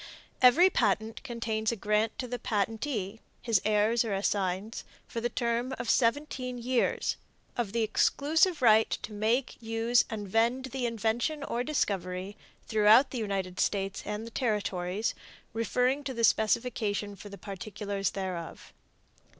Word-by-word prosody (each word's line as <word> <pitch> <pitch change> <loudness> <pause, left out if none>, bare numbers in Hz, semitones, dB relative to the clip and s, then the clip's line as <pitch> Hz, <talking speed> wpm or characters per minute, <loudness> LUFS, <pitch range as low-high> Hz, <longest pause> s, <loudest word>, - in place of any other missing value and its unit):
Every 320 +10 +7
patent 220 - 0
contains 230 -4 -2
a - - -2
grant 210 +1 0
to 250 - -4
the 245 0 -4
patentee, 220 0 -2 0.2
his 225 -6 +1
heirs 215 +2 +3
or 215 -4 -2
assigns, 195 +1 -1 0.2
for 230 - -4
the 240 - 0
term 240 +2 -1
of - - 0
seventeen 255 0 0
years, 245 +1 0 0.4
of 235 -5 -2
the 230 +1 +1
exclusive 300 - +2
right 220 -1 +6
to 215 - -4
make, 230 +6 0
use 225 +1 +2
and 210 -2 -5
vend 235 +6 +1
the 255 -3 -1
invention 230 +6 -1
or 245 -3 -2
discovery 195 - -2 0.3
throughout 220 +4 +5
the 250 - -3
United 195 -4 -3
States 195 -1 0
and 210 +1 -4
the 230 - -9
Territories, 210 -4 -1 0.4
referring 250 +5 +1
to 260 -2 -4
the 230 - -2
specification 215 -2 +1
for 205 +1 -11
the 200 - -9
particulars 200 0 -4
thereof. 185 -4 -6
225 Hz, 140 wpm, -29 LUFS, 205-245 Hz, 0.4 s, Every